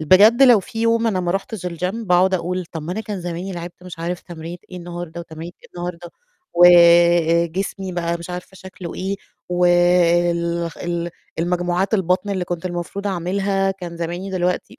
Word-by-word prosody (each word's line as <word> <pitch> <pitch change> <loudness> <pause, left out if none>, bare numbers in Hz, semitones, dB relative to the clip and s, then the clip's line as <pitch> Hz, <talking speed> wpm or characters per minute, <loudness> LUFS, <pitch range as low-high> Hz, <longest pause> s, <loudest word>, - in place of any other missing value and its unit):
بجد 205 - +6
لو 245 -5 +7
فيه 225 +4 -7
يوم 230 0 +2
أنا 195 -5 +1
ما 175 -1 -1
رُحتش 195 0 -3
الgym 180 +4 -3
باقعد 185 +1 +4
أقول 180 0 -2
طَب 160 0 -5
أنا 200 +5 -2
كان 205 -3 -5
زماني 175 +2 -5
لعبت 175 0 -8
مش 180 -2 -10
عارف 175 +1 -3
تمرينة 170 0 -8
إيه 185 - -8
النهارده 175 -1 -7
وتمرينة 165 +1 -9
إيه - - -16
النهارده، 175 -1 -6 0.4
وجسمي 170 +1 +5
بقى 170 -1 -1
مش 170 +1 -8
عارفة 180 +1 -7
شكله 185 -2 -9
إيه 195 +2 -3 0.3
وال 175 -1 +3
ال 170 0 -2 0.3
المجموعات 175 +3 0
البطن 190 +1 +1
اللي 190 -2 -1
كنت 175 0 -4
المفروض 180 +3 -4
أعملها 195 +1 0
كان 175 -3 -7
زماني 175 +3 -4
دلوقتي 180 -1 -2
175 Hz, 160 wpm, -21 LUFS, 170-190 Hz, 0.4 s, لو